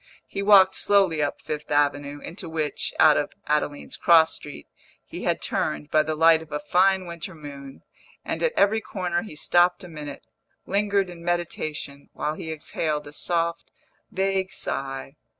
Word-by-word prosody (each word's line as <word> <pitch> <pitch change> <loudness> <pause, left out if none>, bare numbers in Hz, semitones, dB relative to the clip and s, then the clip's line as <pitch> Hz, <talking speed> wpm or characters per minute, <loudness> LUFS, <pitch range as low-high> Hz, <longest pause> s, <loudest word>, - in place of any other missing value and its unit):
He 195 - -5
walked 195 -2 +7
slowly 190 -7 +3
up 145 - -2
Fifth 150 0 -5
Avenue, 145 0 +1
into 170 -1 -7
which, 155 -2 -2
out 155 -2 +6
of 145 - -2
Adeline's 150 -1 -1
cross 165 -2 +5
street, 145 - -9 0.4
he - - -7
had - - 0
turned, 75 -1 -2
by 155 - +5
the 155 +1 -2
light 160 0 +5
of 160 -1 -13
a 150 - -2
fine 185 +5 +2
winter 170 +1 -7
moon; 140 -3 -10 0.4
and - - -3
at - - +1
every 220 +2 +3
corner 180 -5 -2
he 195 -7 -9
stopped 175 +4 +3
a - - -8
minute, 150 -4 -8 0.4
lingered 200 0 +1
in 170 -1 -11
meditation, 155 -5 -3
while 150 - -2
he 160 +1 -6
exhaled 150 -1 -3
a 145 - -11
soft, 170 +1 -1 0.4
vague 190 0 0
sigh. 135 0 -5
160 Hz, 165 wpm, -25 LUFS, 150-185 Hz, 0.4 s, walked